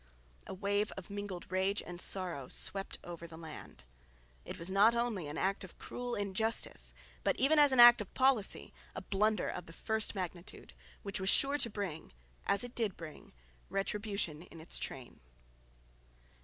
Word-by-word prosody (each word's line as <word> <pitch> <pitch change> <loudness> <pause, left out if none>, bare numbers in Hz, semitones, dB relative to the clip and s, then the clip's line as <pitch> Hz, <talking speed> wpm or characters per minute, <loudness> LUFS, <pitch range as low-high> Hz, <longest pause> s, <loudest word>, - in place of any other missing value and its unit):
A - - -5
wave 205 +2 0
of 195 0 -8
mingled 205 -3 -5
rage 190 +2 +1
and 175 0 -5
sorrow 175 -9 -2
swept 195 0 0
over 170 -1 -8
the 160 -1 -11
land. 155 - -10 0.6
It - - -7
was 170 +3 -2
not 210 +4 +5
only 230 -9 -1
an 145 - -5
act 195 +1 0
of 185 - -12
cruel 245 -1 -5
injustice, 200 - 0 0.3
but - - +2
even 300 +4 +4
as 290 -2 +7
an 260 - +2
act 240 -1 +10
of 205 - -7
policy 260 -6 +1 0.2
a - - -5
blunder 210 0 +1
of 180 - -5
the 165 - -11
first 220 +4 -1
magnitude, 180 -1 -6 0.3
which 200 -1 -2
was 190 0 +2
sure 280 +6 +4
to 235 - +4
bring, 190 - -5 0.3
as 200 - +2
it 245 0 -7
did 220 -5 -1
bring, 155 -3 -10 0.4
retribution 200 -5 -2
in 170 -2 -13
its 160 - -3
train. 130 -3 -6
195 Hz, 170 wpm, -34 LUFS, 175-220 Hz, 0.6 s, act